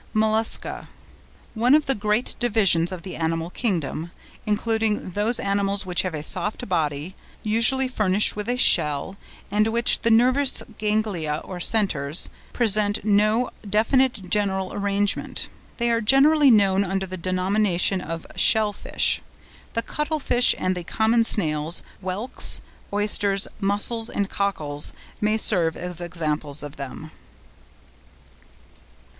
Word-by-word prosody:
MOLLUSCA.—One 220 Hz, +2 st, -1 dB
of 305 Hz, -, +2 dB
the 270 Hz, -, +1 dB
great 210 Hz, +1 st, -1 dB
divisions 200 Hz, -8 st, +2 dB
of 180 Hz, -2 st, -7 dB
the 190 Hz, -, -7 dB
animal 165 Hz, +1 st, -2 dB
kingdom, 170 Hz, -, -2 dB, 0.4 s
including 215 Hz, -1 st, -1 dB
those 210 Hz, +6 st, 0 dB
animals 200 Hz, 0 st, 0 dB
which 180 Hz, -1 st, +1 dB
have 185 Hz, -4 st, -4 dB
a 150 Hz, -, -5 dB
soft 190 Hz, +5 st, -2 dB
body, 155 Hz, -1 st, -2 dB, 0.3 s
usually 230 Hz, +5 st, +2 dB
furnished 210 Hz, -5 st, +1 dB
with 210 Hz, +2 st, -5 dB
a 245 Hz, -, 0 dB
shell, 150 Hz, -, +2 dB, 0.4 s
and 210 Hz, +1 st, +2 dB
in -, -, -1 dB
which 235 Hz, +1 st, +2 dB
the 230 Hz, -, 0 dB
nervous 255 Hz, +4 st, +3 dB, 0.2 s
ganglia, 210 Hz, -8 st, -1 dB
or 185 Hz, -2 st, -8 dB
centres, 170 Hz, -7 st, 0 dB, 0.2 s
present 210 Hz, -3 st, +1 dB
no 215 Hz, +3 st, +2 dB, 0.2 s
definite 225 Hz, 0 st, +1 dB
general 190 Hz, -1 st, 0 dB
arrangement. 200 Hz, 0 st, -1 dB, 0.3 s
They 235 Hz, 0 st, 0 dB
are 230 Hz, 0 st, +1 dB
generally 275 Hz, +5 st, +5 dB
known 200 Hz, -4 st, +4 dB
under 195 Hz, 0 st, -2 dB
the 185 Hz, 0 st, -7 dB
denomination 185 Hz, +1 st, 0 dB
of 165 Hz, -1 st, -6 dB
"shellfish"; 215 Hz, -2 st, +2 dB, 0.5 s
the 230 Hz, -, -2 dB
cuttle 305 Hz, +1 st, -3 dB
fish, 250 Hz, -3 st, +3 dB
and 185 Hz, 0 st, -1 dB
the 180 Hz, -, -4 dB
common 225 Hz, +5 st, +1 dB
snails, 160 Hz, -6 st, +3 dB, 0.2 s
whelks, 200 Hz, +7 st, 0 dB, 0.3 s
oysters, 205 Hz, -1 st, +1 dB
mussels, 205 Hz, +3 st, -2 dB
and 200 Hz, -1 st, -2 dB
cockles, 155 Hz, -8 st, -2 dB, 0.3 s
may 215 Hz, +1 st, +2 dB
serve 175 Hz, -7 st, +4 dB
as 180 Hz, -1 st, -4 dB
examples 155 Hz, -4 st, -3 dB
of 145 Hz, 0 st, -9 dB
them. 145 Hz, +3 st, -8 dB
205 Hz, 125 wpm, -23 LUFS, 180-225 Hz, 0.5 s, generally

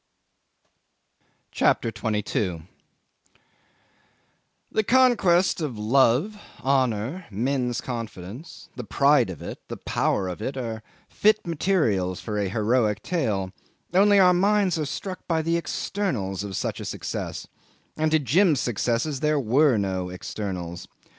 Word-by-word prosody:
CHAPTER 115 Hz, -, +2 dB
22 105 Hz, -4 st, -2 dB, 2.1 s
'The 220 Hz, -, +1 dB
conquest 210 Hz, -9 st, +3 dB
of 140 Hz, -8 st, -3 dB
love, 135 Hz, -, +2 dB, 0.2 s
honour, 130 Hz, -, 0 dB
men's 125 Hz, +3 st, -1 dB
confidence 115 Hz, -, -7 dB
the 125 Hz, -, -5 dB
pride 140 Hz, +2 st, +3 dB
of 85 Hz, -6 st, -7 dB
it, -, -, -7 dB
the -, -, -6 dB
power 95 Hz, -, 0 dB
of 90 Hz, +3 st, -6 dB
it, 130 Hz, +4 st, -4 dB
are 115 Hz, -3 st, -4 dB, 0.3 s
fit 215 Hz, +1 st, +2 dB
materials 145 Hz, -, 0 dB
for 105 Hz, -2 st, -3 dB
a 100 Hz, -2 st, -1 dB
heroic 110 Hz, 0 st, +1 dB
tale; 105 Hz, -, -1 dB, 0.4 s
only 200 Hz, +2 st, +5 dB
our 180 Hz, -2 st, +6 dB
minds 195 Hz, -1 st, +2 dB
are 155 Hz, -, -1 dB
struck 185 Hz, +6 st, -6 dB
by 160 Hz, -2 st, +1 dB
the 165 Hz, +1 st, +1 dB
externals 135 Hz, -, -2 dB
of 100 Hz, -2 st, -5 dB
such -, -, -3 dB
a -, -, -6 dB
success, -, -, -5 dB, 0.5 s
and 155 Hz, 0 st, +1 dB
to 155 Hz, -, +4 dB
Jim's 155 Hz, -, +3 dB
successes 120 Hz, +5 st, -1 dB
there 150 Hz, 0 st, +1 dB
were 130 Hz, +1 st, +3 dB
no 95 Hz, -2 st, -2 dB
externals. 90 Hz, -1 st, -6 dB
130 Hz, 125 wpm, -25 LUFS, 105-165 Hz, 2.1 s, our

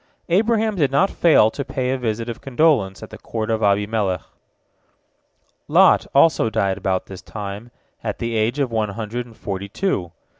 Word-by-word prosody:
Abraham 220 Hz, +4 st, +2 dB
did 145 Hz, -5 st, +2 dB
not 160 Hz, +9 st, +2 dB
fail 150 Hz, -10 st, +4 dB
to 140 Hz, -, -4 dB
pay 130 Hz, -1 st, -2 dB
a 135 Hz, -, 0 dB
visit 115 Hz, -1 st, -2 dB
of 120 Hz, -, -6 dB
condolence 135 Hz, -8 st, +1 dB
at -, -, -10 dB
the -, -, -10 dB
court 110 Hz, -1 st, -4 dB
of 110 Hz, 0 st, 0 dB
Abimelech. 100 Hz, -2 st, +1 dB, 1.4 s
Lot -, -, +5 dB
also 140 Hz, -5 st, +4 dB
died 100 Hz, -3 st, 0 dB
about 95 Hz, -1 st, -1 dB
this 95 Hz, -2 st, -10 dB
time, 105 Hz, +2 st, -7 dB, 0.3 s
at -, -, -3 dB
the 115 Hz, 0 st, -3 dB
age 110 Hz, +5 st, 0 dB
of 135 Hz, -4 st, 0 dB
one 110 Hz, -2 st, 0 dB
hundred 115 Hz, +4 st, -5 dB
and 115 Hz, -, -17 dB
forty 100 Hz, 0 st, -5 dB
two. 100 Hz, -, -2 dB
115 Hz, 175 wpm, -21 LUFS, 100-135 Hz, 1.4 s, Lot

